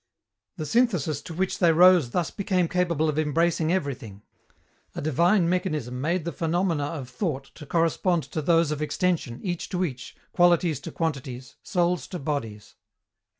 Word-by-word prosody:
The 155 - -4
synthesis 180 - +1
to 170 - -8
which 190 +2 -1
they 170 -2 +5
rose 175 -4 +6
thus 170 +6 -1
became 190 -4 0
capable 170 -3 0
of 155 0 0
embracing 160 +1 +1
everything. 125 - -3 0.7
A - - -4
divine 170 +5 +3
mechanism 155 -9 -2
made 170 +3 0
the 170 - -2
phenomena 165 -1 0
of 145 -4 -5
thought 140 - -4
to 150 - -12
correspond 165 +1 +1
to 155 - -2
those 165 0 +3
of 150 0 -3
extension, 150 -6 -1
each 175 -3 -3
to 180 0 0
each, 130 -6 -7 0.2
qualities 175 -4 +3
to - - -8
quantities, 135 -5 -4
souls 175 -1 0
to 180 - -5
bodies. 115 -9 -4
165 Hz, 155 wpm, -25 LUFS, 145-180 Hz, 0.7 s, rose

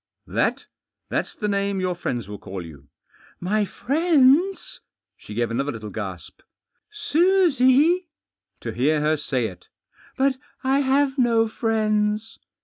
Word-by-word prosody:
* - - -57 0.2
That - - 0 0.2
— - - -59
that's - - -2
the 210 - -3
name 200 -1 0
your 185 -1 0
friends 120 - -4
will 105 -1 -8
call 95 -1 -7
yovu* 70 -4 -13 0.5
"My 205 +4 0
friends?" 310 - +2 0.4
She 105 - -11
gave 120 0 0
another 135 +5 -1
little 110 -3 -7
gasp. 95 -5 -7 0.5
"Susie?" 345 -4 +3 0.5
To - - -4
hear 150 +5 +1
her 155 +1 +2
say 135 -5 -2
it 90 -4 -8 0.5
1 275 +1 +3
"But 260 - -11 0.2
I 265 +1 +2
have 275 0 +1
no 230 -2 +3
friends." 215 -1 -1
215 Hz, 140 wpm, -23 LUFS, -, 0.5 s, Susie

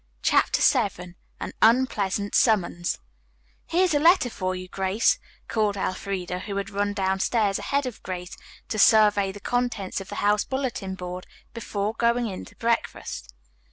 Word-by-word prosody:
CHAPTER - - +3
VII 200 -9 +1 0.3
AN - - -5
UNPLEASANT 210 -5 +2
SUMMONS 175 -6 +2 0.7
"Here's 360 0 +2
a 290 - +3
letter 330 -5 +4
for 185 -2 -2
you, 185 0 -7
Grace," 190 +4 +1 0.3
called 210 -2 0
Elfreda, 185 -1 -3
who 200 +1 -6
had 200 +1 -3
run 205 0 -1
downstairs 195 +2 +1
ahead 280 0 -1
of 250 -4 -6
Grace 180 -1 -6 0.3
to 215 - -2
survey 205 -2 +5
the 205 - -10
contents 225 -5 -2
of 195 - -10
the - - -6
house 205 0 +3
bulletin 250 -8 -3
board 180 0 -7 0.3
before 210 -2 -3
going 235 +1 +1
in 195 -4 -5
to - - -16
breakfast. 230 - -2
205 Hz, 150 wpm, -25 LUFS, 190-235 Hz, 0.7 s, survey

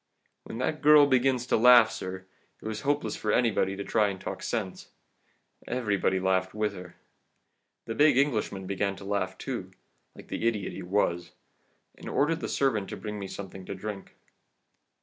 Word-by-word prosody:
"When - - -7
that 130 +5 -2
girl 150 0 +7
begins 130 -2 +2
to - - +2
laugh, 120 -1 +7
sir, 95 -3 -6 0.3
it - - -15
was 110 0 -4
hopeless 145 +3 -1
for 110 - -2
anybody 105 -5 +1
to 100 - -5
try 105 +1 +2
and 95 -2 -4
talk - - -6
sense. 100 -6 -4 0.8
Everybody 105 -6 0
laughed 95 +1 0
with 105 -1 -1
her. 90 -2 -10 0.9
The 115 - -4
big 150 +1 +4
Englishman 110 -8 0
began 100 +1 -1
to 95 - -11
laugh 95 -2 -2
too, - - -5 0.5
like - - -14
the 115 - -1
idiot 105 -4 -1
he - - -7
was, 90 -2 -1 0.7
and - - -8
ordered 160 +3 +1
the - - -4
servant 110 -8 0
to - - -6
bring 105 -1 -6
me 100 - -5
something 95 -1 -8
to 100 - -6
drink. 100 0 -7
105 Hz, 170 wpm, -28 LUFS, 95-125 Hz, 0.9 s, girl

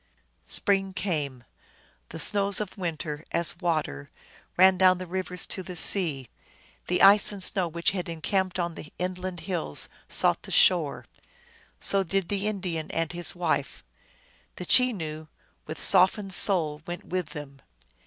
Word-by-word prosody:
Spring 195 -2 0
came. 150 -10 -3 0.7
The 160 - -8
snows 200 +4 0
of 210 -3 -6
winter, 160 -4 -5
as 170 +1 -3
water, 155 - -3 0.5
ran 190 +1 +6
down 185 -1 +5
the 185 - -7
rivers 180 0 -4
to 190 - -5
the 180 0 -9
sea; 160 -7 +4 0.6
the 180 - +1
ice 200 +2 +8
and 200 -2 +3
snow 185 -1 +2
which 170 +1 -1
had 180 -3 -5
encamped 185 +3 -2
on 170 -1 -3
the 150 - -11
inland 180 -1 -5
hills 170 - -1 0.2
sought - - +2
the - - -12
shore. - - +2 0.7
So 195 - +1
did 190 0 -2
the 205 0 -2
Indian 180 -6 -4
and 165 -1 -2
his 175 0 +1
wife; 160 -6 -3 0.7
the 180 - -8
Chenoo, 165 -11 +2 0.4
with 155 0 -7
softened 190 +1 +2
soul, 160 -7 0
went 175 0 -7
with 180 -3 -3
them. 140 -2 -10
180 Hz, 145 wpm, -26 LUFS, 160-190 Hz, 0.7 s, ice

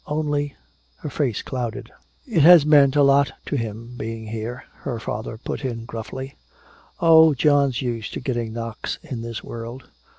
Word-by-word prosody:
Only 145 -1 -1 0.2
" - - -39
her 150 - -4
face 130 -6 -1
clouded. 125 -1 -5 0.4
"It 215 -10 +2
has 165 0 +8
meant 145 -3 +5
a 145 - +5
lot 140 +1 +4
to - - -3
him, 115 0 -5
being 115 0 -5
here," 115 +3 -5
her 120 -5 -5
father 110 +1 -5
put 120 - -5
in 115 -3 -4
gruffly. 125 +4 -7 0.6
"Oh, 160 -2 +6
John's 140 -2 +2
used 115 -3 -3
to - - -3
getting 120 -3 -3
knocks 115 -1 -5
in 135 -8 -6
this 115 -1 -6
world." 120 +2 -7
125 Hz, 165 wpm, -23 LUFS, 115-145 Hz, 0.6 s, has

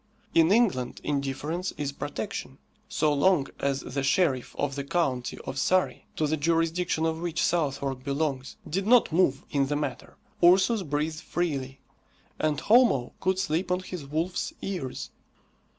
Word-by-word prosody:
In 165 +1 +5
England, 195 - +2
indifference 145 +5 -2
is 145 -1 -2
protection. 140 -1 -5 0.3
So 155 -8 +2
long 145 0 +3
as 140 -1 0
the 140 +2 -3
sheriff 135 -2 +1
of 145 -1 -1
the 140 0 -3
county 135 -5 -1
of 135 - -4
Surrey, 185 0 +1
to 155 - +1
the 155 +1 0
jurisdiction 165 +1 +1
of 160 0 -1
which 170 -1 -1
Southwark 140 -5 0
belongs, 140 -2 -2
did 195 +5 -2
not 245 -4 +5
move 155 -5 +2
in 140 -2 +2
the 145 - -1
matter, 145 -4 -4 0.3
Ursus 190 +5 +5
breathed 155 0 -2
freely, 140 -7 -3 0.6
and 155 -2 +1
Homo 215 - +4
could 190 0 +1
sleep 180 -1 -1
on 180 +1 +1
his 180 -6 -7
wolf's 165 +5 -2
ears. 180 -10 -4
155 Hz, 150 wpm, -27 LUFS, 140-180 Hz, 0.6 s, In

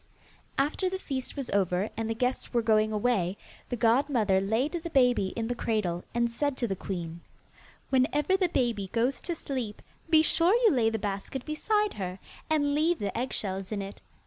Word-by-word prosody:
After 300 +7 +1
the 380 - -3
feast 270 -8 -4
was 275 -3 -4
over 190 0 +1
and 225 0 -2
the 225 - -1
guests 250 +1 -2
were 235 - +3
going 215 -1 +3
away, 205 -4 +1 0.3
the 245 - -1
godmother 230 -4 +3
laid 225 +9 +1
the 335 -1 -4
baby 250 - +3
in 225 -1 -2
the 245 - 0
cradle, 210 -7 -1
and 235 0 +2
said 285 +2 -1
to 240 - 0
the 195 - -1
queen, 170 -3 -5 0.7
'Whenever 295 +7 +3
the 375 -2 +2
baby 230 - 0
goes 245 +4 +1
to 345 - -3
sleep, 255 -9 -4 0.3
be 315 -2 +6
sure 340 +5 +3
you 440 - +7
lay 235 -5 +3
the 225 - -1
basket 205 +5 -4
beside 420 +7 +1
her, 185 -2 -4 0.3
and 290 -2 +2
leave 320 +4 +2
the 200 -2 -3
eggshells 195 -6 -3
in 205 -2 -2
it. 195 +1 -9
240 Hz, 185 wpm, -29 LUFS, 205-290 Hz, 0.7 s, you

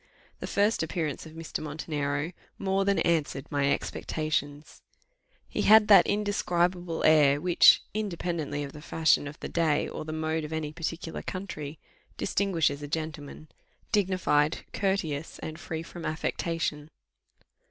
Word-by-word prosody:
The - - -5
first 205 +3 +2
appearance 160 -2 -3
of 155 - -13
Mr. 165 0 -5
Montenero 150 0 -3 0.3
more 195 0 0
than 200 0 +2
answered 150 -5 0
my 140 -1 +2
expectations. 150 -1 -3 0.7
He - - -2
had 215 0 +7
that 200 - +8
indescribable 180 -4 0
air, 145 -3 +5
which, 175 +2 +6
independently 170 -8 -2
of 140 - -6
the 150 - -11
fashion 160 -2 +2
of 145 +2 -9
the - - -4
day, 160 -3 +1
or - - -6
the 155 - -6
mode 160 0 -1
of 150 - -6
any 155 -1 -3
particular 165 0 -4
country, 155 -6 -6 0.4
distinguishes 165 -7 0
a 145 - -5
gentleman 155 0 -5 0.4
dignified, 185 -7 +1
courteous, 165 -7 -1
and 155 0 -7
free 160 0 -5
from 170 0 -9
affectation. 155 -1 -2
160 Hz, 135 wpm, -28 LUFS, 150-175 Hz, 0.7 s, that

